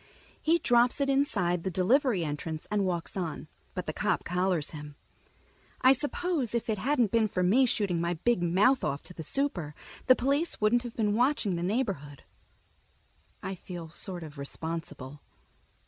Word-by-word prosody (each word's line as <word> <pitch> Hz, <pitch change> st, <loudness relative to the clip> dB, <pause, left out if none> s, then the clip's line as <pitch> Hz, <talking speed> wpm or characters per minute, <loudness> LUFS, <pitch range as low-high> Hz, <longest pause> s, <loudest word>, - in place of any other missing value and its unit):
He 330 Hz, +2 st, +3 dB
drops 245 Hz, -3 st, +3 dB
it 275 Hz, -1 st, +2 dB
inside 200 Hz, -, +1 dB
the 190 Hz, -, -2 dB
delivery 195 Hz, -, +2 dB
entrance 155 Hz, +1 st, -4 dB
and 205 Hz, -2 st, +1 dB
walks 175 Hz, -2 st, -3 dB
on, 175 Hz, -5 st, -4 dB, 0.3 s
but -, -, -3 dB
the -, -, -3 dB
cop -, -, 0 dB
collars 180 Hz, -3 st, 0 dB
him. 150 Hz, -2 st, -9 dB, 0.9 s
I 255 Hz, -, +7 dB
suppose 290 Hz, -, -1 dB
if 235 Hz, -1 st, -1 dB
it 210 Hz, -, -2 dB
hadn't 250 Hz, -4 st, +2 dB
been 225 Hz, -2 st, +3 dB
for 185 Hz, -3 st, -1 dB
me 245 Hz, +9 st, +4 dB
shooting 195 Hz, -7 st, 0 dB
my 170 Hz, +1 st, 0 dB
big 225 Hz, +5 st, +1 dB
mouth 195 Hz, +10 st, +3 dB
off 140 Hz, +1 st, -2 dB
to 180 Hz, -, -12 dB
the 165 Hz, -, -7 dB
super, 175 Hz, -, -2 dB, 0.3 s
the 255 Hz, -, +8 dB
police 280 Hz, +7 st, 0 dB
wouldn't 215 Hz, +3 st, +3 dB
have 240 Hz, -1 st, -7 dB
been 210 Hz, -2 st, +1 dB
watching 240 Hz, -5 st, +2 dB
the 170 Hz, -, -3 dB
neighborhood. 180 Hz, -, -2 dB, 1.2 s
I 190 Hz, -, -3 dB
feel 175 Hz, -3 st, -8 dB
sort 175 Hz, +1 st, -4 dB
of 150 Hz, -2 st, -10 dB
responsible. 150 Hz, -2 st, -5 dB
195 Hz, 165 wpm, -29 LUFS, 170-245 Hz, 1.2 s, the